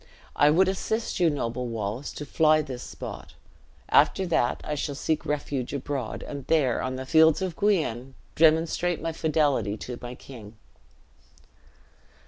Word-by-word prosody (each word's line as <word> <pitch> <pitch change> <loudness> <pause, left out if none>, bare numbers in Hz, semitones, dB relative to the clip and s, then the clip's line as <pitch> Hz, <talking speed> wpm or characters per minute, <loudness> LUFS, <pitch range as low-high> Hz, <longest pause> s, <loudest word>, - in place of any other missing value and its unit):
I 145 - +5
would 180 +5 +4
assist 220 +4 -2
you, 175 -2 +4
noble 125 -4 -3
Wallace, 115 +3 -4
to 150 - -6
fly 155 +1 +3
this 130 -3 -7
spot. - - -8 0.5
After 190 - +4
that, 160 -8 +1
I 150 - -3
shall 145 -1 -3
seek 155 +2 -2
refuge 140 -3 -2
abroad; 135 -4 -4
and 140 -2 -7
there, 140 -7 +2
on 130 0 -3
the 130 0 -5
fields 160 +2 +5
of 185 -3 -3
Guienne, 135 - 0 0.2
demonstrate 165 +2 +3
my 165 +1 -3
fidelity 145 -10 0
to 125 +2 -7
my 125 0 -7
king." 115 -6 -12
145 Hz, 145 wpm, -26 LUFS, 125-160 Hz, 0.5 s, I